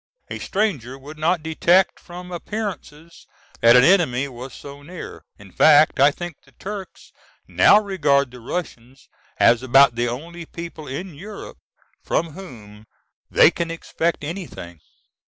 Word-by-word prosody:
A -, -, -5 dB
stranger 145 Hz, -, -2 dB
would 150 Hz, +3 st, -12 dB
not 165 Hz, +1 st, 0 dB
detect 170 Hz, +4 st, +2 dB
from 180 Hz, +1 st, -11 dB
appearances 175 Hz, -4 st, -7 dB, 0.3 s
that 115 Hz, +1 st, +6 dB
an 125 Hz, -, +7 dB
enemy 140 Hz, -7 st, +3 dB
was 130 Hz, 0 st, -9 dB
so 140 Hz, 0 st, -11 dB
near. 170 Hz, +5 st, -10 dB, 0.2 s
In 100 Hz, -2 st, -15 dB
fact 150 Hz, -, +5 dB
I 140 Hz, +2 st, +7 dB
think 175 Hz, +1 st, -7 dB
the -, -, -24 dB
Turks 200 Hz, -1 st, -9 dB, 0.4 s
now 205 Hz, -, +5 dB
regard 145 Hz, -10 st, +1 dB
the 125 Hz, -, -12 dB
Russians 130 Hz, -2 st, -7 dB, 0.3 s
as 115 Hz, 0 st, +4 dB
about 135 Hz, +1 st, +5 dB
the 120 Hz, +1 st, -1 dB
only 165 Hz, +7 st, -7 dB
people 165 Hz, -3 st, -9 dB
in 175 Hz, +7 st, -6 dB
Europe 200 Hz, +8 st, -10 dB, 0.4 s
from 165 Hz, -, -2 dB
whom 110 Hz, -, -12 dB, 0.4 s
they -, -, +6 dB
can 170 Hz, -1 st, -4 dB
expect 165 Hz, 0 st, -3 dB
anything. 150 Hz, -, -8 dB
155 Hz, 140 wpm, -21 LUFS, 130-175 Hz, 0.4 s, an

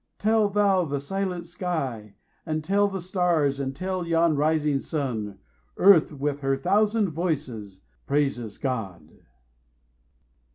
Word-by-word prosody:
tell 215 Hz, 0 st, +2 dB
thou 200 Hz, -2 st, +3 dB
the 145 Hz, -3 st, -2 dB
silent 180 Hz, +3 st, -3 dB
sky, 140 Hz, -, -4 dB, 0.3 s
And 155 Hz, -1 st, -3 dB
tell 200 Hz, +4 st, +2 dB
the 195 Hz, -1 st, -4 dB
stars, 170 Hz, -6 st, +1 dB
and 135 Hz, -1 st, -3 dB
tell 185 Hz, +3 st, -3 dB
yon 165 Hz, -1 st, +3 dB
rising 150 Hz, -1 st, +1 dB
sun 115 Hz, -10 st, -3 dB, 0.4 s
Earth, 190 Hz, -5 st, +6 dB
with 145 Hz, 0 st, -2 dB
her 135 Hz, -1 st, 0 dB
thousand 210 Hz, +5 st, +2 dB
voices, 135 Hz, -, -3 dB, 0.3 s
praises 135 Hz, -7 st, -1 dB
GOD. 115 Hz, -10 st, -5 dB
155 Hz, 120 wpm, -25 LUFS, 135-185 Hz, 0.4 s, Earth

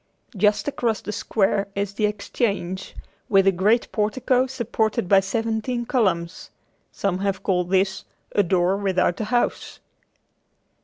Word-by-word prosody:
Just 205 Hz, +5 st, +2 dB
across 235 Hz, -7 st, -1 dB
the 210 Hz, -, -5 dB
square 200 Hz, -1 st, 0 dB
is 200 Hz, 0 st, -2 dB
the 210 Hz, +1 st, +1 dB
Exchange 200 Hz, -3 st, -3 dB, 0.3 s
with 195 Hz, -2 st, +4 dB
a 195 Hz, -, +6 dB
great 205 Hz, +6 st, +2 dB
portico 250 Hz, +4 st, +1 dB
supported 230 Hz, -6 st, -1 dB
by 195 Hz, +1 st, +6 dB
seventeen 225 Hz, +4 st, -2 dB
columns. 185 Hz, -10 st, -1 dB, 0.4 s
Some 190 Hz, -2 st, -2 dB
have 195 Hz, -1 st, -2 dB
called 180 Hz, -2 st, 0 dB
this 190 Hz, 0 st, +1 dB, 0.3 s
"A 205 Hz, -, +3 dB
door 185 Hz, 0 st, +1 dB
without 190 Hz, -1 st, 0 dB
a -, -, -1 dB
house." 240 Hz, +3 st, -1 dB
200 Hz, 135 wpm, -23 LUFS, 190-225 Hz, 0.4 s, a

